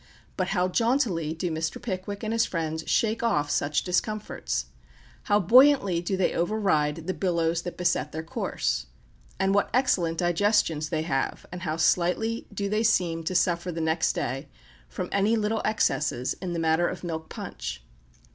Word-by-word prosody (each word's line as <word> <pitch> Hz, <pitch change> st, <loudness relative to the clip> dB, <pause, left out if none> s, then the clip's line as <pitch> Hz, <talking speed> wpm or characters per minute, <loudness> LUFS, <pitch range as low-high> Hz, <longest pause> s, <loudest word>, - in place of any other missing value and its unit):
But 185 Hz, -, -1 dB
how 180 Hz, -2 st, +1 dB
jauntily 190 Hz, -, +1 dB
do 170 Hz, +1 st, -2 dB
Mr. 160 Hz, +1 st, -2 dB
Pickwick 200 Hz, -1 st, -5 dB
and 220 Hz, +1 st, -1 dB
his 230 Hz, 0 st, +3 dB
friends 160 Hz, -2 st, -3 dB
shake 225 Hz, 0 st, +1 dB
off 150 Hz, -11 st, +1 dB
such 145 Hz, 0 st, +1 dB
discomforts! 185 Hz, -, -2 dB, 0.6 s
How 205 Hz, 0 st, +3 dB
buoyantly 230 Hz, -3 st, +5 dB
do 190 Hz, +2 st, -2 dB
they 185 Hz, -, +1 dB
override 165 Hz, -5 st, 0 dB
the 185 Hz, -, -1 dB
billows 170 Hz, -3 st, 0 dB
that 175 Hz, 0 st, -7 dB
beset 170 Hz, -5 st, 0 dB
their 160 Hz, +1 st, -5 dB
course! -, -, -2 dB, 0.5 s
And 190 Hz, 0 st, +2 dB
what 200 Hz, -, +2 dB
excellent 180 Hz, -11 st, +2 dB
digestions 175 Hz, -3 st, +1 dB
they 155 Hz, -1 st, -1 dB
have, 135 Hz, -5 st, -2 dB
and 180 Hz, 0 st, -6 dB
how 160 Hz, -3 st, -2 dB
slightly 180 Hz, +7 st, +1 dB
do 200 Hz, 0 st, -2 dB
they 215 Hz, +2 st, 0 dB
seem 175 Hz, -7 st, +1 dB
to 185 Hz, -, -2 dB
suffer 175 Hz, 0 st, +1 dB
the 165 Hz, -, -5 dB
next 160 Hz, 0 st, +1 dB
day 135 Hz, +4 st, -3 dB, 0.4 s
from 180 Hz, -, -4 dB
any 200 Hz, +3 st, +2 dB
little 220 Hz, 0 st, 0 dB
excesses 150 Hz, -, 0 dB
in 180 Hz, -2 st, -3 dB
the -, -, -2 dB
matter 165 Hz, +1 st, +2 dB
of -, -, -5 dB
milk 160 Hz, -2 st, -5 dB
punch! -, -, -6 dB
175 Hz, 165 wpm, -26 LUFS, 160-205 Hz, 0.6 s, buoyantly